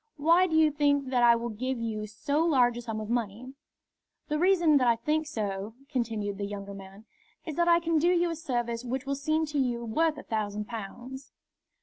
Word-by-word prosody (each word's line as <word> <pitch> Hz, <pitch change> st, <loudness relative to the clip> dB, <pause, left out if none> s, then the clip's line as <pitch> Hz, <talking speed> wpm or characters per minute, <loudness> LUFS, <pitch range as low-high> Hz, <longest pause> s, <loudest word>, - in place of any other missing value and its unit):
Why 335 Hz, +5 st, +4 dB
do 320 Hz, -, -1 dB
you 315 Hz, -1 st, +5 dB
think 285 Hz, -2 st, +1 dB
that 250 Hz, -2 st, +2 dB
I 235 Hz, -1 st, +6 dB
will 235 Hz, +1 st, -3 dB
give 255 Hz, +4 st, -3 dB
you 215 Hz, -2 st, -3 dB
so 285 Hz, +9 st, -1 dB
large 255 Hz, -7 st, +3 dB
a 240 Hz, -, -5 dB
sum 225 Hz, -2 st, -5 dB
of 215 Hz, -, -5 dB
money?" 235 Hz, +2 st, -3 dB, 0.8 s
"The 300 Hz, 0 st, 0 dB
reason 345 Hz, -4 st, +4 dB
that 255 Hz, -3 st, +2 dB
I 235 Hz, -, +5 dB
think 305 Hz, +6 st, -1 dB
so," 210 Hz, -5 st, -4 dB
continued 220 Hz, -6 st, -2 dB
the 200 Hz, -, -2 dB
younger 200 Hz, -1 st, -7 dB
man, 195 Hz, +2 st, -12 dB, 0.4 s
"is 315 Hz, -, -4 dB
that 345 Hz, +3 st, +1 dB
I 340 Hz, 0 st, +6 dB
can 330 Hz, -2 st, +1 dB
do 335 Hz, -, +2 dB
you 345 Hz, -1 st, +2 dB
a -, -, -3 dB
service 240 Hz, -7 st, -3 dB
which 255 Hz, +2 st, -3 dB
will 275 Hz, -, -1 dB
seem 310 Hz, +3 st, 0 dB
to 295 Hz, -1 st, -2 dB
you 240 Hz, -3 st, -1 dB
worth 310 Hz, +7 st, +1 dB
a 290 Hz, -, -8 dB
thousand 210 Hz, -1 st, -3 dB
pounds." 240 Hz, +5 st, -8 dB
255 Hz, 215 wpm, -28 LUFS, 220-305 Hz, 0.8 s, I